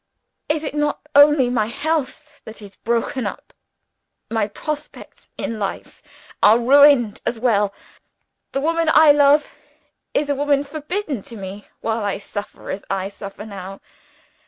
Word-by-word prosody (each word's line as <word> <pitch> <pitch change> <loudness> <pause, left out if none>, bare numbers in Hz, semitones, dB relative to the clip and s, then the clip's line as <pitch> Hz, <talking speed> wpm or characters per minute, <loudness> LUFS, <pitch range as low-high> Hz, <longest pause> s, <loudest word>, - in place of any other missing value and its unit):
It 305 0 0
is 290 - -4
not 295 0 -1
only 290 -2 +6
my 220 -4 +1
health 300 +2 -3
that 220 - -10
is 200 -3 -12
broken 235 +1 -1
up, - - -9 0.8
my 220 -2 +1
prospects 305 +7 -7
in 225 -1 -4
life 200 -2 -5 0.4
are 215 +2 +7
ruined 255 -3 +5
as 235 - -2
well. 210 -4 +2 0.8
The 275 - -1
woman 330 +1 +1
I 310 -1 +7
love 290 +1 +4 0.6
is 290 - +1
a 285 - +1
woman 285 0 +1
forbidden 305 - -4
to 230 - -11
me 195 +1 -8
while 225 -1 -1
I 200 -1 -1
suffer 205 +1 -7
as 195 - -5
I 195 0 -2
suffer 200 +1 -9
now. 195 -2 -8
250 Hz, 145 wpm, -21 LUFS, 210-295 Hz, 0.8 s, are